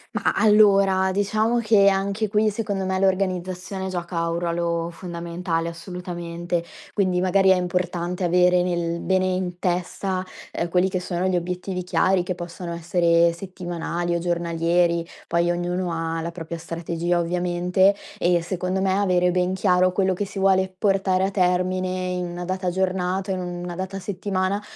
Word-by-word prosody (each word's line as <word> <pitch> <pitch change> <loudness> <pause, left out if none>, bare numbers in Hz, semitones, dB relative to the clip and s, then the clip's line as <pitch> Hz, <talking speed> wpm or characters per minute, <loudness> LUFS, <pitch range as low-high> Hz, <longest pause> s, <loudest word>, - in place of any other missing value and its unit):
Mah, - - +1
allora, 200 -3 +5
diciamo 215 +4 +1
che 215 -4 +4
anche 200 +2 +1
qui, 210 +1 +2
secondo 205 -3 -2
me, 190 0 0
l'organizzazione 185 0 -1
gioca 170 -2 -2
un 165 - -1
ruolo 170 -1 -1
fondamentale, 170 -1 -3
assolutamente. 175 0 -4 0.3
Quindi 185 -3 +1
magari 190 +1 +3
è 190 - +7
importante 180 0 -2
avere 180 +1 +4
nel 170 -1 -1
bene 185 0 +1
in 185 -1 -2
testa, 185 +1 -1 0.3
ehm, 170 - -2
quelli 180 +2 +3
che 185 -1 -2
sono 180 0 -2
gli 185 -1 +1
obiettivi 180 +1 -3
chiari 185 +1 +2
che 180 +1 -3
possono 175 0 -6
essere 170 0 +3
settimanali 175 -1 -4
o 170 - 0
giornalieri. 170 0 +1 0.2
Poi 170 +1 +1
ognuno 175 +1 -1
ha 165 0 -2
la 170 +1 -4
propria 165 -1 -6
strategia, 170 +1 -2
ovviamente 180 +2 +2 0.2
e 175 0 +3
secondo 185 +1 -2
me 190 -1 +2
avere 180 -3 +2
ben 180 +1 +1
chiaro 185 -1 +3
quello 190 0 +1
che 200 +3 -2
si 195 0 -10
vuole 190 -1 +3
portare 190 -2 +2
a 195 - +1
termine 185 0 +1
in 180 -1 -2
una 175 0 -5
data 185 0 -1
giornata, 190 +1 -1
o - - +1
in 185 - -3
una 175 0 -5
data 190 +2 -4
settimana, 190 +1 -2
180 Hz, 160 wpm, -23 LUFS, 175-190 Hz, 0.3 s, è